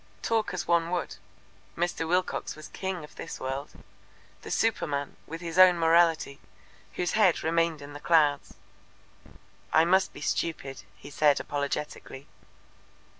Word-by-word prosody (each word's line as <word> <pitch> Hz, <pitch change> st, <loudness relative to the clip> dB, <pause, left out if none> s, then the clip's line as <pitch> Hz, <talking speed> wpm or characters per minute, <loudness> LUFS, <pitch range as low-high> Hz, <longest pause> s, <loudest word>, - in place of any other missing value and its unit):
Talk 225 Hz, -2 st, 0 dB
as 180 Hz, -, -4 dB
one 170 Hz, -1 st, +2 dB
would, 180 Hz, 0 st, -3 dB, 0.6 s
Mr. 170 Hz, -1 st, -1 dB
Wilcox 180 Hz, +2 st, -1 dB
was 155 Hz, 0 st, -11 dB
king 190 Hz, -3 st, -4 dB
of 150 Hz, -, -12 dB
this -, -, -7 dB
world, 135 Hz, +2 st, -4 dB, 0.7 s
the -, -, -9 dB
superman, 145 Hz, -11 st, -1 dB
with 165 Hz, +2 st, -7 dB
his 170 Hz, +1 st, -3 dB
own 185 Hz, -1 st, +8 dB
morality, 165 Hz, -4 st, +3 dB, 0.5 s
whose 175 Hz, -1 st, -1 dB
head 200 Hz, -6 st, +3 dB
remained 165 Hz, -2 st, 0 dB
in 145 Hz, 0 st, -10 dB
the 145 Hz, -, -8 dB
clouds. 150 Hz, -3 st, +2 dB, 1.2 s
"I 160 Hz, +1 st, +5 dB
must 190 Hz, +2 st, +3 dB
be -, -, -11 dB
stupid," 145 Hz, -3 st, -2 dB, 0.2 s
he 145 Hz, -, -12 dB
said 145 Hz, 0 st, +3 dB
apologetically. 140 Hz, -1 st, -4 dB
165 Hz, 135 wpm, -28 LUFS, 145-175 Hz, 1.2 s, own